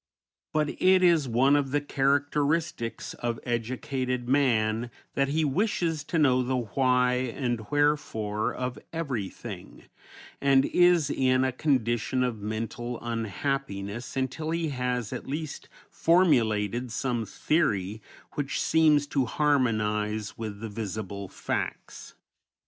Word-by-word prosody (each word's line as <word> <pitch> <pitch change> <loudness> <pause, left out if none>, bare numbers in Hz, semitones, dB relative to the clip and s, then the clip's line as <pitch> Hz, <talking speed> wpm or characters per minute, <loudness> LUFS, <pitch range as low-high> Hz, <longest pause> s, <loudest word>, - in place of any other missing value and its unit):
But 150 -1 +1
it 185 0 +5
is 165 -7 +4
one 130 +5 +4
of 140 -2 +1
the 145 +2 +1
characteristics 145 -1 0
of 120 -1 -3
educated 125 +1 -2
man 120 -4 +2 0.2
that 140 0 +1
he 155 +3 +1
wishes 165 -1 0
to 165 - -2
know 130 -5 +4
the 130 +1 0
why 125 +1 +2
and 120 -2 -2
wherefore 130 -8 0
of 125 -1 -4
everything, 135 - -5 0.6
and 135 -1 +4
is 175 -5 +4
in 130 0 +2
a 130 - +1
condition 125 -2 +1
of 120 -4 -2
mental 115 +3 -4
unhappiness 115 -1 -3
until 135 +4 -2
he 165 -1 -1
has 125 -4 -2
at - - -6
least 150 +2 -5 0.2
formulated 120 - +2
some 120 0 -1
theory 110 - 0 0.3
which 145 -2 -2
seems 155 -2 +4
to 140 -2 0
harmonize 110 -7 0
with 110 -2 -6
the 115 - -4
visible 100 -2 -5
facts. - - -5
130 Hz, 120 wpm, -27 LUFS, 115-145 Hz, 0.6 s, it